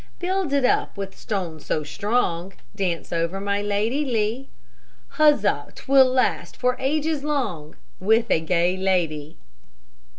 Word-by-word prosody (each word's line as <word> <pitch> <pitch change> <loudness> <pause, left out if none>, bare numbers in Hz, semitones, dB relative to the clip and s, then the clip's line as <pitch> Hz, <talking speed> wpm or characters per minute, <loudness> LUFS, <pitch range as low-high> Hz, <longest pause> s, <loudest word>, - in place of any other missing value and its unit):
Build 370 -3 -1
it 280 -2 +2
up 250 - +1
with 195 -1 -5
stone 180 -7 -4
so 155 +1 -2
strong, 190 0 -1 0.2
Dance 180 -5 -2
over 170 +3 -1
my 200 0 -1
Lady 210 +7 0
Lee; 235 0 -1 0.7
Huzza! 300 -1 +3
'twill 265 -1 +4
last 250 -9 0
for 250 0 +1
ages 300 +2 0
long, 215 - -2 0.2
With 220 +4 +2
a - - +4
gay 175 +2 +1
lady. 170 -6 -1
205 Hz, 130 wpm, -23 LUFS, 175-265 Hz, 0.7 s, twill